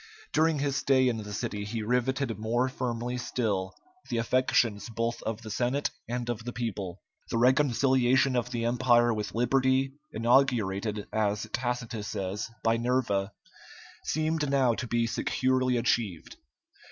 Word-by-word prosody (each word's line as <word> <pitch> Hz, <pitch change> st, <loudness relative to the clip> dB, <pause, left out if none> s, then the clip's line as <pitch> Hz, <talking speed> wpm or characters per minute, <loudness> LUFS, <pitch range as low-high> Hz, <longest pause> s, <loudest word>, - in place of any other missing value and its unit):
During 160 Hz, 0 st, +3 dB
his 140 Hz, -1 st, 0 dB
stay 130 Hz, -1 st, +3 dB
in 120 Hz, -2 st, +1 dB
the 105 Hz, -1 st, -7 dB
city 105 Hz, 0 st, -3 dB
he 110 Hz, +2 st, -4 dB
riveted 125 Hz, +1 st, 0 dB
more 120 Hz, +4 st, +1 dB
firmly 125 Hz, -1 st, -3 dB
still 105 Hz, -6 st, -2 dB, 0.3 s
the -, -, -1 dB
affections 115 Hz, -2 st, +1 dB
both 115 Hz, +1 st, -2 dB
of 110 Hz, +1 st, -4 dB
the 110 Hz, -, -7 dB
Senate 130 Hz, +5 st, 0 dB, 0.2 s
and 120 Hz, 0 st, -2 dB
of 120 Hz, -2 st, -3 dB
the 125 Hz, -, -4 dB
people. 105 Hz, -7 st, -4 dB, 0.3 s
The -, -, -1 dB
reconciliation 130 Hz, 0 st, +3 dB
of 120 Hz, 0 st, 0 dB
the 120 Hz, -2 st, -2 dB
Empire 120 Hz, 0 st, +3 dB
with 105 Hz, -2 st, -4 dB
liberty, 130 Hz, +2 st, +2 dB, 0.2 s
inaugurated, 110 Hz, -4 st, +1 dB
as 105 Hz, 0 st, 0 dB
Tacitus 120 Hz, -3 st, -2 dB
says, 95 Hz, +3 st, -3 dB
by 115 Hz, 0 st, +3 dB
Nerva, 115 Hz, -5 st, 0 dB, 0.7 s
seemed 155 Hz, -1 st, 0 dB
now 135 Hz, -3 st, +3 dB
to 120 Hz, +3 st, -4 dB
be 115 Hz, 0 st, +1 dB
securely 130 Hz, +2 st, +1 dB
achieved. 115 Hz, -7 st, -1 dB
120 Hz, 140 wpm, -28 LUFS, 110-130 Hz, 0.7 s, During